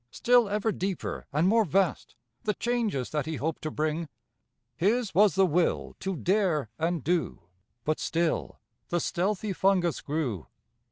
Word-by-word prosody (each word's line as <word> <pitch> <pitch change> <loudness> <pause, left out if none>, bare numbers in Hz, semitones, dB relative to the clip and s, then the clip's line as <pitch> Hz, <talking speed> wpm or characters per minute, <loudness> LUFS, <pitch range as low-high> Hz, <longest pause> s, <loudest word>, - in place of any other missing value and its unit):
Still 240 - +3
ever 210 +2 0
deeper 190 -2 -4
and 150 +5 +2
more 225 +3 +4
vast, 185 -3 0 0.3
The 210 -2 +1
changes 230 - -1
that 150 -1 -1
he 160 - -2
hoped 155 +3 -3
to 155 - -3
bring. 155 +1 -2 0.7
His 210 +3 +1
was 205 0 +5
the 195 0 +5
will 175 0 0
to 190 -1 -2
dare 170 - +1
and 165 -2 0
do; 175 +1 0 0.4
But 155 +3 0
still 165 -1 -1 0.3
the 175 - +1
stealthy 195 +4 -1
fungus 185 -3 +2
grew. 140 - -3
175 Hz, 150 wpm, -28 LUFS, 155-200 Hz, 0.7 s, was